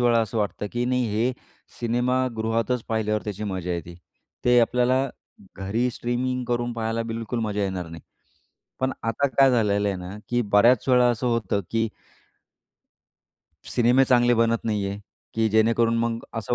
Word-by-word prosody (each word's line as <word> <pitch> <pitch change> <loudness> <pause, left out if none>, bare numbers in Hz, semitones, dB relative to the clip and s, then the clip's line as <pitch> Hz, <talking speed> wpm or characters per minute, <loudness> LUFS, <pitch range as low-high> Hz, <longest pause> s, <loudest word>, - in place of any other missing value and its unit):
वेळा 120 -1 +4
असं 110 0 -2
वाटतं, 105 0 -2
की 120 0 -1
नाही 125 -1 +1
हे 120 +4 +1 0.5
सिनेमागृहातच 120 -1 0
पाहिल्यावर 110 -1 0
त्याची 105 0 -4
मजा 95 -3 -3
येते. 85 0 -5 0.5
ते 125 0 +5
आपल्याला 125 +3 +2 0.5
घरी 105 +6 -1
स्ट्रीमिंग 125 +1 -2
करून 120 0 -1
पाहायला 115 0 -2
बिलकुल 115 +1 -4
मजा 105 -2 -1
येणार 95 -3 -3
नाही. 80 0 -10 0.8
पण 130 0 0
आता 115 +5 +1
काय 135 0 +4
झालेलं 105 -4 +2
आहे 100 - -1
ना, 90 +3 -8
की 120 0 +1
बऱ्याच 110 +4 +4
वेळा 125 -1 +5
असं 120 +1 -1
होतं 115 -4 0
की 115 0 +1 1.9
सिनेमे 125 +3 +4
चांगले 120 -1 +4
बनत 115 0 +1
नाही 105 -3 -1
आहे, 100 +1 -5 0.3
की 110 0 +2
जेणेकरून 115 +2 +3
मग 115 0 0 0.2
असं 115 +1 -2
115 Hz, 150 wpm, -24 LUFS, 105-120 Hz, 1.9 s, ते